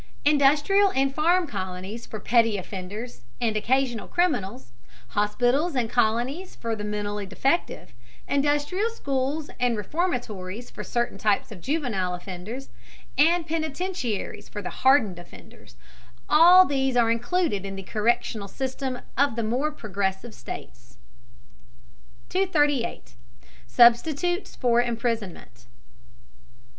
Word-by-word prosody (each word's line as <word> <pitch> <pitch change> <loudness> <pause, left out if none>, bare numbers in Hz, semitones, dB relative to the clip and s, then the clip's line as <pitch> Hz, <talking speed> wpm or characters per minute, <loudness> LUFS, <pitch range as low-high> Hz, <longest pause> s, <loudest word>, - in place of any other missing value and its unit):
Industrial 295 +7 +4
and 270 0 +2
farm 345 +5 +3
colonies 190 - -6
for 215 - -6
petty 230 -1 +3
offenders 195 - -7 0.2
and 225 -2 0
occasional 240 +1 0
criminals, 195 - -1 0.4
hospitals 245 - +1
and 235 -3 0
colonies 245 +9 0
for 230 -1 -3
the 210 - -6
mentally 210 -1 -3
defective, 275 - -1 0.3
industrial 290 +9 +1
schools 285 - -2
and 245 -2 +1
reformatories 225 - -3
for - - -7
certain 240 -4 -2
types 210 +1 +1
of 190 -5 -10
juvenile 235 - -1
offenders, 195 +9 -7 0.5
and 335 +3 +4
penitentiaries 315 - -3
for 205 -2 -6
hardened 250 -9 +3
offenders, 170 - -15 0.5
all 350 +4 +8
these 270 -4 0
are 230 -1 +4
included 240 - 0
in 195 0 -5
the 195 - -7
correctional 215 0 -1
system 260 +2 -4
of 275 -1 +2
the 230 - -1
more 250 +7 0
progressive 200 -3 -3
states. - - -10 1.3
238. 295 - 0 0.5
SUBSTITUTES 285 - +3
FOR 240 -2 +3
IMPRISONMENT. 225 - -4
240 Hz, 110 wpm, -25 LUFS, 205-290 Hz, 1.3 s, all